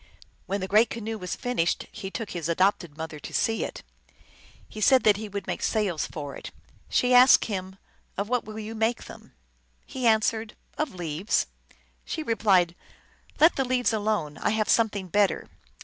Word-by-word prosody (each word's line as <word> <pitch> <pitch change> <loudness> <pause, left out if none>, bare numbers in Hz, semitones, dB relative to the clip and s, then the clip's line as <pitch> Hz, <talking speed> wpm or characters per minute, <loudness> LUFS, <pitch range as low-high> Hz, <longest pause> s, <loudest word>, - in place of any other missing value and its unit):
When 200 +1 -2
the 190 - -3
great 215 +3 +4
canoe 225 -1 -5
was 180 -1 -4
fin 245 0 -4
ished 165 +1 +1
he 200 -3 -6
took 225 +1 -5
his 170 -2 -4
(adopted) 175 -3 +1
mother 160 -1 -6
to - - -9
see 225 0 +1
it. - - -6 0.8
He 215 - -9
said 260 +4 +5
that 210 -2 +5
he 215 0 -6
would 200 -1 -5
make - - -4
sails 195 -8 0
for 145 -3 -7
it. - - -8 0.4
She 250 0 +2
asked 250 +1 +7
him, 190 -2 -5 0.2
" - - -38
Of 200 - -1
what 250 +1 0
will 215 0 -9
you 220 +1 -6
make 225 +2 0
them? - - -13 0.3
" - - -41 0.2
He 255 -2 -2
answered, 220 0 +1
" - - -35
Of 300 -9 -2
leaves." 170 +3 -1 0.6
She 320 - -4
replied, 195 - +2 0.3
" - - -30
Let 320 +3 +5
the 270 - +2
leaves 250 -2 +1
alone. 205 -9 -1
I - - 0
have 215 0 0
something 210 -4 +2
better." 205 +3 +1
210 Hz, 195 wpm, -26 LUFS, 185-225 Hz, 0.8 s, asked